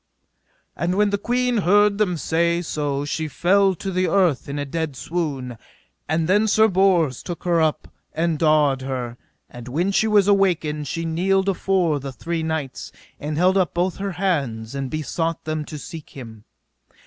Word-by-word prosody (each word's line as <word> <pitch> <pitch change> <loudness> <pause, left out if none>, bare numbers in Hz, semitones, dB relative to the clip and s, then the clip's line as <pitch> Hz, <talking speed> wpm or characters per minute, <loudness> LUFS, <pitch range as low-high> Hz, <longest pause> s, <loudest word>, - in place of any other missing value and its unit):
And 175 +2 -1
when 205 0 +2
the 200 - 0
queen 245 +2 0
heard 205 +2 +3
them 180 -5 +1
say 170 +4 0
so 145 -3 -2
she 155 +2 -2
fell 190 +6 +2
to 195 +3 -5
the 185 0 +1
earth 180 -9 +1
in 140 - -4
a 145 - -2
dead 160 0 -3
swoon. 135 -6 -4 0.5
And 160 +1 +1
then 205 +4 +3
Sir 220 +1 +5
Bors 180 - +2
took 175 -2 -7
her 170 -2 +2
up, 155 -1 0 0.2
and 165 -1 -1
dawed 150 -4 +3
her; 125 -3 -4 0.3
and 120 0 -11
when 170 +10 0
she 220 +2 +2
was 205 -2 +4
awaked 170 -7 +1
she 165 +5 -3
kneeled 190 +4 +1
afore 180 -5 +1
the 135 0 -6
three 165 +7 -4
knights, 160 -4 -4 0.3
and 150 +1 -4
held 185 +3 +3
up 180 -6 +1
both 180 0 0
her 195 -1 -3
hands, 140 - -2
and 135 -1 -3
besought 165 +2 -2
them 155 -1 -3
to 150 - -7
seek 155 +1 -9
him. 115 -5 -11
165 Hz, 175 wpm, -22 LUFS, 145-190 Hz, 0.5 s, Sir